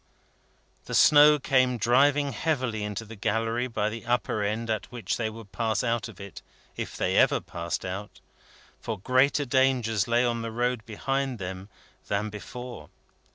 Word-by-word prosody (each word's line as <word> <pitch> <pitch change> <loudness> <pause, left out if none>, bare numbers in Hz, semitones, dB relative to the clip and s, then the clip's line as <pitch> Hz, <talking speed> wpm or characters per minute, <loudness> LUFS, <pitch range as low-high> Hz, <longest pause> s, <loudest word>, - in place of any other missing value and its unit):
The - - -4
snow 150 0 +7
came 130 -2 +2
driving 140 +5 +3
heavily 125 -4 -1
into 105 +2 -4
the 115 +1 -10
gallery 115 +4 -1
by 110 -3 -1
the 115 +1 -8
upper 120 -3 0
end 110 +3 -2
at 110 -2 -3
which 120 -2 -3
they 110 -2 -1
would 110 -2 -11
pass 110 0 -1
out 120 0 0
of 110 -5 -13
it, 100 0 -9 0.3
if - - -5
they - - 0
ever - - +4
passed 85 0 -5
out; 95 +3 -6 0.6
for 110 - -4
greater 130 +7 +2
dangers 125 -5 +2
lay 120 +1 +3
on 120 -1 -1
the 115 0 -4
road 120 0 -1
behind 135 +4 -2
them 95 0 -6 0.4
than 100 +2 -1
before. 120 +4 -8
115 Hz, 160 wpm, -27 LUFS, 105-125 Hz, 0.6 s, snow